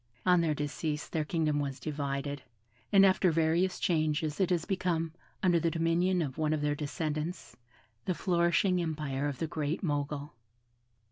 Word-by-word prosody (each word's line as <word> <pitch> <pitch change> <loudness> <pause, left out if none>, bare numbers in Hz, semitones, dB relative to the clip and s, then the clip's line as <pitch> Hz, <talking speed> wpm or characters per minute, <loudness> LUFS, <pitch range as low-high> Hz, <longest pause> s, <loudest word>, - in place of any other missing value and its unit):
On 180 -1 +5
their 160 -2 +1
decease 150 +1 -3
their 160 - -1
kingdom 155 -2 0
was 140 -2 -3
divided, 140 -1 -3 0.5
and 195 -1 +7
after 190 -1 +4
various 165 +3 +1
changes 155 -2 0
it 190 - +2
has 175 -3 +1
become, 170 -4 -1 0.3
under 175 -2 +4
the 165 +1 +1
dominion 170 +2 +1
of 140 0 -5
one 155 0 +1
of 155 - -1
their 150 0 +1
descendants, 150 0 -4 0.5
the 185 - 0
flourishing 175 +1 +2
empire 150 -4 -2
of 140 -3 -3
the 165 - -1
Great 155 +3 -2
Mogul. 145 -2 -2
160 Hz, 155 wpm, -31 LUFS, 150-175 Hz, 0.5 s, and